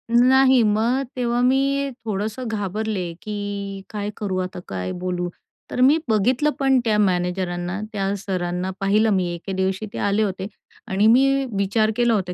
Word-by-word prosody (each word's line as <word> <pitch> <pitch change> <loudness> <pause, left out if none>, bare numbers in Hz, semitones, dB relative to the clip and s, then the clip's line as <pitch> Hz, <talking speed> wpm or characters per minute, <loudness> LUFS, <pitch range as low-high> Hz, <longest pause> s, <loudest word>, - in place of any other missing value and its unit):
नाही. 260 +1 +6
मग 225 +5 +2
तेव्हा 240 -1 0
मी 275 +2 +2 0.2
थोडंसं 220 +4 -3
घाबरले 205 -3 -2
की 205 -2 -5
काय 205 -1 -4
करू 195 -3 -2
आता 185 -1 -4
काय 90 -1 -4
बोलू? 180 -1 -2 0.4
तर 250 - -1
मी 280 +5 +6
बघितलं 245 +8 +2
पण 270 -1 +4
त्या 215 -1 +2
मॅनेजरांना 180 -1 0
त्या 195 0 -1
सरांना 180 -1 -2
पाहिलं 210 +3 +3
मी 185 -2 +1
एके 180 +3 -6
दिवशी 190 +2 -1
ते - - -5
आले 205 +2 +1
होते 190 -1 -3 0.4
आणि 200 +3 +2
मी 250 +4 +6 0.3
विचार 215 +2 +2
केला 240 -1 +3
होता 185 -4 -1
205 Hz, 155 wpm, -22 LUFS, 190-235 Hz, 0.4 s, नाही